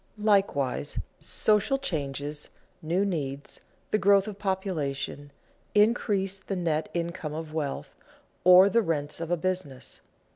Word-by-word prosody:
Likewise, 195 - +1 0.2
social 215 +5 +2
changes, 145 - -3 0.3
new 175 +5 +1
needs, 145 -7 -4 0.3
the 215 - +3
growth 200 +1 +4
of 205 -2 -7
population, 165 -8 -2 0.5
increase 205 -3 +2
the 195 - -4
net 160 -4 -1
income 170 -2 -3
of 160 -1 -6
wealth, 150 -3 -3 0.5
or 180 +2 +8
the 230 +4 +3
rents 150 -5 -2
of 165 - -4
a 175 - +1
business. 180 -7 -4
175 Hz, 120 wpm, -27 LUFS, 150-195 Hz, 0.5 s, or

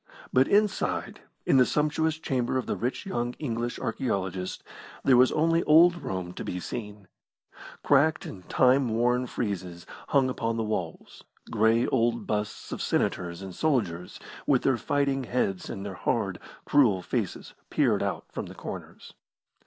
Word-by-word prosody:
But 130 +1 +5
inside, 205 0 +1 0.2
in - - +4
the 130 - +7
sumptuous 155 +1 +1
chamber 130 -4 -1
of 130 - -2
the - - -2
rich 125 - -3
young 120 -10 -2
English 120 -4 -3
archaeologist, 95 -6 -3 0.4
there 130 - +5
was 125 +1 +6
only 165 +2 +2
old 170 +3 +6
Rome 90 -2 -4
to - - -6
be 90 - -4
seen. 105 -1 -7 0.8
Cracked 150 +3 +3
and 95 -2 -10
time 130 0 +4
worn 125 +3 +1
friezes 90 -7 -4 0.2
hung 135 -2 +3
upon 115 -3 -2
the 115 - 0
walls, 90 -7 -5 0.3
grey 115 +2 +3
old 120 -2 +1
busts 105 -1 -3
of - - -4
senators 90 0 -1
and 95 -1 -7
soldiers 100 - -1 0.3
with 135 -3 +3
their 130 -2 +3
fighting 140 +2 0
heads 100 -7 -1
and 95 - -5
their 100 - -5
hard, - - -1 0.3
cruel 110 -11 +3
faces - - -3 0.2
peered - - +2
out - - -2
from - - -5
the - - -11
corners. - - -9
120 Hz, 155 wpm, -27 LUFS, 100-135 Hz, 0.8 s, the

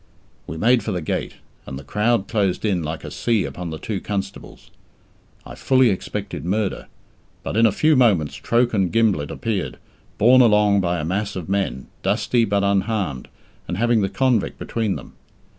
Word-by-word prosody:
We 80 - -6
made 115 +6 +3
for 105 - -4
the 90 - -2
gate, - - -3 0.3
and 65 - -6
the 70 - -9
crowd 105 - 0
closed 100 -3 0
in 95 -5 +1
like 80 0 -5
a 75 - -7
sea 105 +7 0
upon 90 -1 -6
the 80 - -5
two 95 +5 -4
constables. 100 -1 -6 0.7
I - - -9
fully 130 -3 +3
expected 100 +1 -5
murder, 100 +3 -2 0.6
but - - -4
in 115 +1 +5
a - - +2
few 155 +9 +3
moments 100 - +3
Troke 120 0 +1
and 95 -4 +1
Gimblett 105 -11 +1
appeared, 110 -5 -3 0.4
borne 125 +4 +6
along 105 -3 +4
by 90 -1 -1
a 75 - -3
mass 100 +4 -2
of 90 -4 -5
men, 95 -11 -1 0.2
dusty, 120 -2 +1
but 100 -1 0
unharmed, 100 - -1 0.4
and 90 - -3
having 115 0 +2
the 95 - 0
convict 125 -4 0
between 110 -4 -2
them. - - -10
100 Hz, 175 wpm, -21 LUFS, 90-115 Hz, 0.7 s, borne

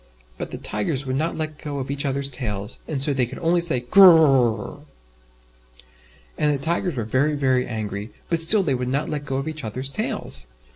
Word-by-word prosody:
But - - -5
the - - -6
Tigers 130 +6 -1
would 130 0 -2
not 155 +5 -1
let 155 -1 -4
go 145 -2 -5
of 135 0 -4
each 140 +1 -2
others' 140 0 -1
tails, 110 -5 -4
and 140 -4 -1
so 145 - +3
they 130 -3 +1
could 130 - -9
only 170 +1 +1
say 160 -8 +3
"Gr 125 +11 +4
r 190 - +11
r 160 -1 +6
rrrrrr!" 120 -6 0 1.6
And 150 -1 +3
the 145 - 0
Tigers 170 +3 -1
were 115 - -2
very, 135 +7 0
very 130 -3 +1
angry, 105 -2 -5 0.2
but 170 - 0
still 195 +5 +5
they 145 -6 +1
would 125 -1 -2
not 140 +4 -1
let 145 -1 -4
go 135 -2 -3
of 135 +3 -4
each 155 -2 -5
others' 130 +5 -4
tails. 65 - -2
135 Hz, 215 wpm, -22 LUFS, 125-155 Hz, 1.6 s, r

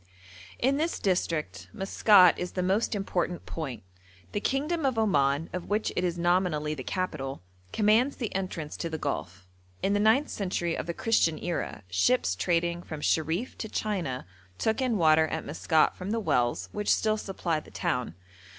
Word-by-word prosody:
In 270 +3 +2
this 325 +3 0
district 150 - -1
Maskat 195 -1 +5
is 180 0 -4
the 180 - -1
most 200 +5 +1
important 180 -3 -2
point; 140 - -5 0.5
the 205 - -1
kingdom 300 +8 -1
of 260 -4 +1
Oman, 150 -7 +2
of 180 -1 -5
which 210 +1 0
it 180 - 0
is 175 -1 -1
nominally 175 -3 +1
the 145 - -6
capital, 140 - -3 0.3
commands 225 +6 +3
the 230 -5 -4
entrance 185 -5 -4
to 170 - -3
the 160 - -3
Gulf. 95 - -4 0.4
In 195 - +2
the 205 - +2
ninth 220 +8 +4
century 175 -4 -2
of - - -4
the 170 - -3
Christian 195 -8 +2
era 175 -10 -4
ships 90 - +2
trading 170 - 0
from 155 -3 -7
Sherif 165 - 0
to 220 - -4
China 175 -15 -2 0.3
took 220 - 0
in 250 -4 +1
water 160 -2 +5
at 160 0 -4
Maskat 155 +1 +2
from 185 +1 -6
the 225 +2 0
wells 120 - 0
which 210 0 0
still 215 0 +2
supply 180 -6 -2
the - - -15
town. 125 -9 -2
180 Hz, 170 wpm, -28 LUFS, 155-210 Hz, 0.5 s, Maskat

